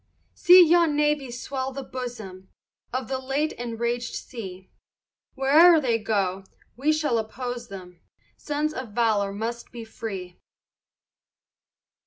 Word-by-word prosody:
See 360 0 +8
yon 335 -2 +3
navy 295 -2 +1
swell 260 +2 -4
the 275 +1 -6
bosom 220 -8 -8 0.4
Of 255 -2 -3
the 265 -1 -2
late 275 +4 -1
enragèd 235 0 -2
sea; 190 -6 -8 0.6
Where'er 310 +5 +6
they 240 -5 0
go, 195 -3 -1 0.3
we 280 +6 +1
shall 305 -7 +1
oppose 240 +2 -5
them, 180 -4 -11 0.3
Sons 300 +1 -2
of 255 -8 -7
valor 215 -4 +1
must 230 +4 -5
be 235 -2 -8
free. 195 -6 -7
245 Hz, 120 wpm, -25 LUFS, 215-280 Hz, 0.6 s, See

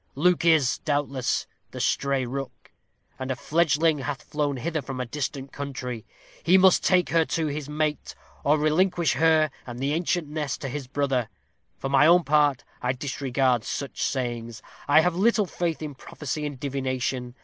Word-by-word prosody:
Luke 175 +5 +2
is, 155 -7 +4
doubtless, 145 -3 -1 0.2
the - - -8
stray 140 -2 +1
rook, 135 +2 -7 0.5
and 130 0 -4
a 130 - 0
fledgeling 155 +1 +2
hath 140 +1 -4
flown 145 -3 -2
hither 160 +3 -2
from 135 -2 -6
a 125 - -1
distant 135 +1 -4
country. 130 -5 -6 0.3
He 180 +3 +5
must 190 -1 +5
take 180 -2 +3
her 165 -1 +4
to 165 0 -1
his 150 -1 -4
mate, 150 0 -2 0.3
or 150 +2 +4
relinquish 170 +3 +2
her 155 +1 +3 0.2
and 120 -1 -7
'the 135 +3 -1
ancient 170 0 0
nest' 150 -2 -3
to 135 - -3
his 135 0 -5
brother. 135 -4 -1 0.5
For - - -4
my 140 +2 +5
own 175 +1 +6
part, 145 -3 +2 0.2
I 125 +1 0
disregard 130 -2 0
such 140 - -5
sayings. 120 -3 -3 0.2
I 145 +2 +6
have 180 +1 +1
little 210 +2 +3
faith 170 -2 -3
in 150 -2 -5
prophecy 150 +2 -5
and 140 -3 -8
divination. 130 -2 -3
145 Hz, 170 wpm, -25 LUFS, 130-160 Hz, 0.5 s, own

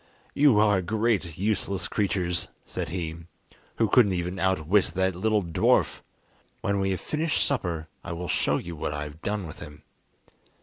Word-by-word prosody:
"You 140 -6 +5
are 105 -2 +4
great 105 -3 0
useless 100 -3 -1
creatures," 90 -4 0 0.2
said - - -4
he, 80 -2 -3 0.6
"who 115 - +2
couldn't 105 -4 +5
even 90 +1 -3
outwit 95 +1 +2
that 95 0 +2
little 105 +3 +1
dwarf. 85 -2 +2 0.6
When 100 0 0
we 95 0 +1
have 95 - -1
finished 155 +1 0
supper 85 - -1 0.2
I - - -6
will 85 +1 -5
show - - +1
you 85 -1 -6
what 75 -1 -3
I 75 - -3
have 75 +2 -9
done 100 -2 -2
with 80 - -9
him!" 75 -2 -11
95 Hz, 165 wpm, -27 LUFS, 85-105 Hz, 0.6 s, You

